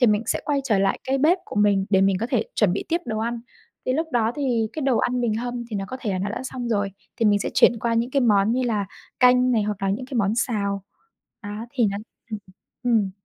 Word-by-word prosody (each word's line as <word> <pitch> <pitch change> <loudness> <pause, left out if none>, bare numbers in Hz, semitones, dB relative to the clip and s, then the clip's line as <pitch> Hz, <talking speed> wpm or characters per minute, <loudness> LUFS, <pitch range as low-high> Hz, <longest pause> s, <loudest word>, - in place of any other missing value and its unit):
thì 245 - +6
mình 210 -1 +3
sẽ - - 0
quay 285 -2 +1
trở 215 -7 +2
lại 195 0 +1
cái 270 +1 0
bếp 320 +7 +4
của - - -9
mình 205 -2 +3
để 190 -2 +4
mình 195 0 +3
có 230 - 0
thể 245 -6 +2
chuẩn 205 -5 +3
bị 195 - -2
tiếp 335 +2 +1
đồ 220 -2 -3
ăn. 235 +1 -2 0.5
Thì 255 - +2
lúc 320 +5 0
đó 230 -2 +2
thì 245 -6 +1
cái 310 - -4
đồ 265 -3 +2
ăn 250 0 0
mình 235 -3 +1
hâm 240 +1 -3
thì 215 - -2
nó 195 - -2
có 260 - -5
thể 220 - -2
là 185 - -1
nó 200 +2 -2
đã 230 - -4
xong 250 -2 -5
rồi 205 -3 0 0.3
thì 230 - 0
mình 205 -1 +4
sẽ - - -3
chuyển 235 - +5
qua 235 0 0
những 230 +2 0
cái 275 - +2
món 210 -2 +4
như 255 +2 +1
là 215 -5 0 0.3
canh 250 0 +5
này 225 -3 +2
hoặc 205 -1 -3
là 195 - +1
những 240 +6 -3
cái 265 - -8
món 205 0 +2
xào. 200 -4 -1 0.6
Đó, 210 +2 -6
thì 245 -5 +2
nó 200 - -3 0.3
hừm, 215 - -3 0.5
ừm, 245 -1 +3
ừm. 200 -3 -1
230 Hz, 275 wpm, -24 LUFS, 205-250 Hz, 0.6 s, thì